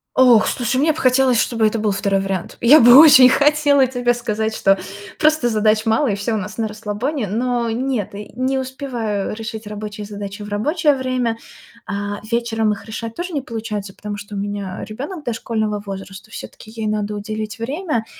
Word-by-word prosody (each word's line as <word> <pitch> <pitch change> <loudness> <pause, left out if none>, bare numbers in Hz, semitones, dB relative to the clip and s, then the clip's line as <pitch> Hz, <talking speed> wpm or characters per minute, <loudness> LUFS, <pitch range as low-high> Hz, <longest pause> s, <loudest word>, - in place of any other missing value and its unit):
Ох, 245 -4 +6
слушай, 245 +1 -1
мне 310 +3 +3
б - - -5
хотелось, 255 -2 +3
чтобы 225 -1 +1
это 220 +1 +1
был 215 0 0
2 195 0 0
вариант. 195 -2 -4
Я 275 +7 +7
бы 240 0 +8
очень 285 -5 +9
хотела 285 -1 +3
тебе 245 -1 0
сказать, 220 -2 -2
что 195 0 +3 0.4
просто 310 -5 +3
задач 215 0 +1
мало, 225 +6 +2
и 195 - 0
всё 200 +3 -2
у - - 0
нас 210 +1 -6
на 220 - 0
расслабоне. 215 +5 -3
Но 240 +3 -1
нет, 245 -4 -2
и 205 +1 -8
не 260 +2 0
успеваю 250 -6 -3
решить 220 0 -7
рабочие 210 0 -7
задачи 205 0 -7
в 205 - -8
рабочее 295 - +1
время. 255 -3 -1 0.5
А, 205 0 -4
вечером 225 -2 0
их 205 - -10
решать 225 +1 -6
тоже 355 +1 -5
не 285 - -1
получается, 215 -5 -5
потому 210 -1 -6
что 205 0 -9
у - - -4
меня 200 -2 -4
ребёнок 290 - -7
дошкольного 220 -3 -2
возраста, 195 +1 -8
всё-таки 220 - -10
ей 220 0 -6
надо 210 0 -2
уделить 215 +1 -5
время. 270 -1 -2
225 Hz, 185 wpm, -19 LUFS, 210-255 Hz, 0.5 s, очень